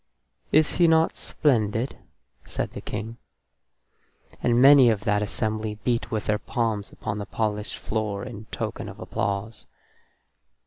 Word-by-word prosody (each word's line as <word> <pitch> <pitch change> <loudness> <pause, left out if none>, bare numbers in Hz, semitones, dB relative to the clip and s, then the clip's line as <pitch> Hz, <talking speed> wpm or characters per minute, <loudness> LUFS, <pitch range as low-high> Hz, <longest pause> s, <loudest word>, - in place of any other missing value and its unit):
"Is 155 0 +3
he 175 - +5
not 160 0 +3
splendid?" 115 -4 0 0.5
said - - -4
the - - -7
King. 110 +2 -5 1.2
And 120 0 +3
many 135 -1 +8
of 110 -3 +1
that 105 -1 +1
assembly 110 +1 -2
beat 120 -2 0
with 110 -2 -2
their 105 0 +1
palms 110 -4 -2
upon 105 - -4
the 100 - -5
polished 105 -1 -2
floor 105 -2 -3
in 110 -4 -8
token - - -5
of - - -11
applause. 100 +3 -3
110 Hz, 135 wpm, -25 LUFS, 105-120 Hz, 1.2 s, many